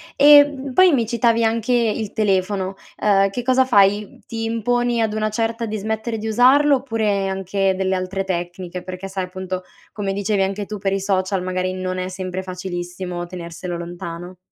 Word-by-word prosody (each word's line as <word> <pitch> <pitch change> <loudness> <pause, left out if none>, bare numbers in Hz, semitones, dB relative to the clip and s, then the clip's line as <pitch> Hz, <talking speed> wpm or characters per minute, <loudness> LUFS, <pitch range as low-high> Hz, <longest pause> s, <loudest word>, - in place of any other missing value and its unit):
E, 290 0 +8
mhmm, 280 -1 -7
poi 370 -1 +6
mi 235 -4 +2
citavi 230 0 +2
anche 230 +2 +1
il 220 -3 0
telefono, 195 -2 0 0.3
uhm, 195 -1 +4
che 240 +5 -4
cosa 260 +1 +3
fai? 205 -3 +2
Ti 225 0 -4
imponi 240 +1 0
ad 220 -1 0
una 215 0 0
certa 230 +1 -2
di 215 -1 -3
smettere 220 +2 -3
di 220 - -5
usarlo? 265 +6 +5
Oppure, 220 -6 -1
anche 195 0 0
delle 190 0 0
altre 185 +1 -2
tecniche? 175 0 -4
Perché 185 +1 -7
sai, 190 -1 -3
appunto, 185 0 -5 0.3
come 200 -2 -3
dicevi 200 0 0
anche 195 +2 -1
tu, 210 +1 -6
per 195 -1 -1
i 195 - 0
social 190 -1 0
magari 185 0 -2
non 185 0 -3
è 185 0 -2
sempre 185 0 -4
facilissimo 180 -1 -5
tenerselo 175 0 -6
lontano. 175 +1 -7
195 Hz, 180 wpm, -21 LUFS, 185-225 Hz, 0.3 s, E